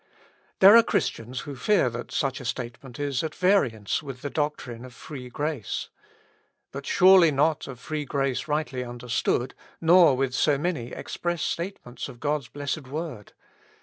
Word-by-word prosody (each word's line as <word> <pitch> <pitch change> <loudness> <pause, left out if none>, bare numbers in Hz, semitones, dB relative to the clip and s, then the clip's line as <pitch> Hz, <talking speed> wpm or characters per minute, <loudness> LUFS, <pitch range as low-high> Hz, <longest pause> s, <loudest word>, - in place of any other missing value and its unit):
There 195 +3 +10
are 230 - +10
Christians 125 - -2
who 145 -2 -7
fear 195 +3 +2
that 120 +1 -7
such 135 -1 -1
a - - -9
statement 120 +1 -6
is 140 -3 -1
at 155 -1 -4
variance 140 - +1
with 135 -4 -9
the 145 - -4
doctrine 145 -6 -3
of 130 -1 -11
free 130 -4 -9
grace. 145 -3 -3 0.8
But 140 0 -7
surely 185 -2 +7
not 150 +2 +1
of 125 -3 -8
free 150 +2 -4
grace 135 +1 -1
rightly 145 -4 -1
understood, 120 +1 -1 0.3
nor 165 -4 +6
with 135 -1 0
so 145 +2 +2
many 150 -6 -2
express 175 -2 -3
statements 170 -9 -4
of 120 -3 -12
God's 145 -2 -1
blessed 145 +1 -4
word. 145 -7 -6
140 Hz, 155 wpm, -26 LUFS, 125-155 Hz, 0.8 s, There